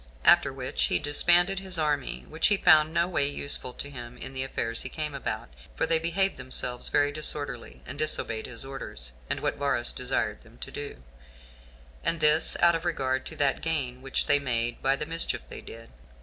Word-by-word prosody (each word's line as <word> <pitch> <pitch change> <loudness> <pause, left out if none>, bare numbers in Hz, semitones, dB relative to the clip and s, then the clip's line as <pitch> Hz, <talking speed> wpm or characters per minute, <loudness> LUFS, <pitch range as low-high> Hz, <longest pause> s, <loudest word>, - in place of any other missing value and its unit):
After - - +6
which 65 +1 -1
he 90 - +2
disbanded 175 - +3
his 190 -2 -1
army, 150 -4 -1
which 160 +1 +1
he 205 - +3
found 155 -4 +5
no 170 +1 +1
way 145 -6 0
useful 140 -2 0
to 140 - -7
him 125 -3 -9
in 130 +1 -6
the 130 - -2
affairs 115 -3 -2
he - - -5
came 150 -2 -4
about; 110 - -4 0.3
for - - 0
they 165 -1 +2
behaved 170 +4 0
themselves 125 -1 -2
very 145 0 +2
disorderly, 145 -4 -1
and 140 +3 -7
disobeyed 115 -7 +1
his 125 +1 -6
orders, 65 - -3 0.2
and - - -2
what - - -1
Varus 140 -4 +1
desired 120 -4 -2
them 115 0 -19
to - - -8
do, 145 - -8 1.0
and 165 - 0
this 155 +1 +4
out 170 0 +6
of 165 0 -2
regard 130 -6 -1
to - - -8
that 140 -2 +1
gain 135 -6 -2
which 135 0 -1
they 145 -1 +4
made 120 -3 -1
by 135 +1 +2
the 150 - -4
mischief 165 +1 +1
they - - -8
did. 115 0 -12
140 Hz, 195 wpm, -27 LUFS, 125-160 Hz, 1.0 s, After